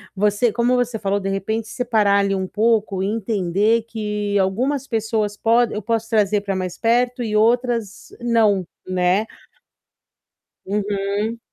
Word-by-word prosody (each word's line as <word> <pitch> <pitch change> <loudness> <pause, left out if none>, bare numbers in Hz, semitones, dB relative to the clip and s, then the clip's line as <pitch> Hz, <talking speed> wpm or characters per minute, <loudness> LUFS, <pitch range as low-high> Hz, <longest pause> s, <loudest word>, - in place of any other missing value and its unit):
você 210 +3 +2
como 240 +2 +1
você 245 -3 -1
falou, 200 0 0
de 195 0 -3
repente, 220 +3 -2
separar 215 -4 +2
ali 200 0 +1
um 190 -1 -2
pouco 215 -3 +1
e 195 - 0
entender 210 +1 +1
que 210 -2 -3
algumas 255 +9 0
pessoas 220 -2 -1
pode 230 +1 +2
eu 215 - -3
posso 225 +1 -1
trazer 210 -2 +2
para 200 -1 -3
mais 185 -1 -4
perto 245 +2 +1
e 215 -2 -2
outras 230 -1 +1
não, 215 -6 +2 0.2
né? 185 +3 +1 1.4
Uhum. 205 +2 -2
215 Hz, 140 wpm, -21 LUFS, 200-230 Hz, 1.4 s, você